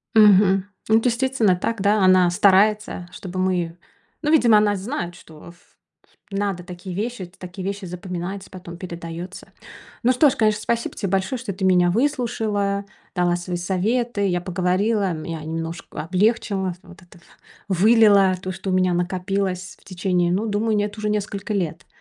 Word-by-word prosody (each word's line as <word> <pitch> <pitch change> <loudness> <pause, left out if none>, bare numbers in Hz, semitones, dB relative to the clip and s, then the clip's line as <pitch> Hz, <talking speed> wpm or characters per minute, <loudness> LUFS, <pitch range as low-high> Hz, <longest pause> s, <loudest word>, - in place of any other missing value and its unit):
Мгм. 195 -3 +6 0.2
Ну, 220 +1 +5
действительно 240 -4 +2
так, 215 +3 -3
да, 205 0 +3
она 185 -1 +5
старается, 200 0 +3
чтобы 185 -1 -7
мы 175 -2 -1 0.4
ну, 300 0 0
видимо, 235 -9 +6
она 210 -1 +3
знает, 190 -3 -4
что 160 -1 -14
в - - -20
в - - -33 0.3
надо 195 -3 -2
такие 180 +1 -8
вещи, 225 -1 -3
это 175 +2 -11
такие 180 +1 -8
вещи 200 0 -4
запоминать, 180 +2 -6
потом 180 -2 -9
передаётся. 170 0 -8 0.5
Ну 250 - +3
что 255 +4 +5
ж, 260 - 0
конечно, 215 -1 +1
спасибо 235 +1 -2
тебе 195 - -2
большое, 195 +7 0
что 230 -4 -5
ты 190 +1 -4
меня 180 -2 +4
выслушала, 215 -5 0 0.3
дала 175 -1 +2
свои 175 0 -4
советы, 205 +5 0
я 175 -2 0
поговорила, 185 +3 0
меня 160 0 -5
немножко 165 +1 -5
облегчило, 190 +1 0
вот 180 -2 -15
это 175 -1 -18 0.5
вылила 200 -1 +5
то, 185 - -4
что 190 +1 -5
у - - 0
меня 185 -1 +2
накопилось 185 +1 -2
в - - -26
течение, 180 -2 0
ну, 210 +5 0
думаю, 215 +1 0
нет, 205 +1 -2
уже 210 0 -1
нескольких 205 -1 -3
лет. 175 -4 -3
190 Hz, 165 wpm, -22 LUFS, 180-210 Hz, 0.5 s, Мгм